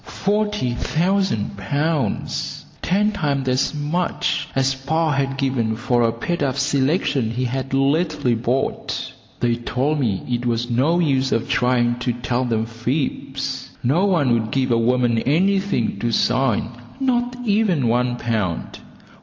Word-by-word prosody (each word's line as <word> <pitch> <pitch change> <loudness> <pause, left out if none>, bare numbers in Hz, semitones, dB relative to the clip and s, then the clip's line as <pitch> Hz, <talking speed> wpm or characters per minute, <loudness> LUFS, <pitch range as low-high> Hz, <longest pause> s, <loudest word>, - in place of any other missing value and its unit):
Forty 210 - -1
thousand 175 - 0
pounds! 145 +9 -2 0.2
Ten 205 +4 +2
times 145 -9 -1
as 130 +3 +1
much 155 +5 -1
as 135 0 +2
"pa" 155 +4 0
had 135 -1 0
given 130 -5 0
for 120 +1 +1
a 115 -1 +3
paid 150 +9 -3
up 135 -2 +1
selection 140 - +1
he 120 +3 -2
had 130 +2 -3
lately 140 -1 +1
bought. 120 +3 -2 0.3
They 120 -1 +2
told 135 +5 -1
me 110 -8 0
it 120 -1 -1
was 120 +1 -1
no 140 +8 +2
use 135 -6 +1
of 115 - +1
me - - -13
trying 120 -1 +2
to 125 0 -1
tell 120 +1 -1
them 115 -2 0
fibs. 135 +2 -3
No 150 +11 +3
one 155 -10 +3
would 110 -2 0
give 130 +1 0
a 115 - +4
woman 120 0 +2
anything 190 - +1
to 120 - -1
sing, 125 0 +1 0.3
not 245 -2 0
even 200 - +2
one 120 +1 +1
pound. 110 -8 -2
130 Hz, 145 wpm, -21 LUFS, 120-155 Hz, 0.3 s, a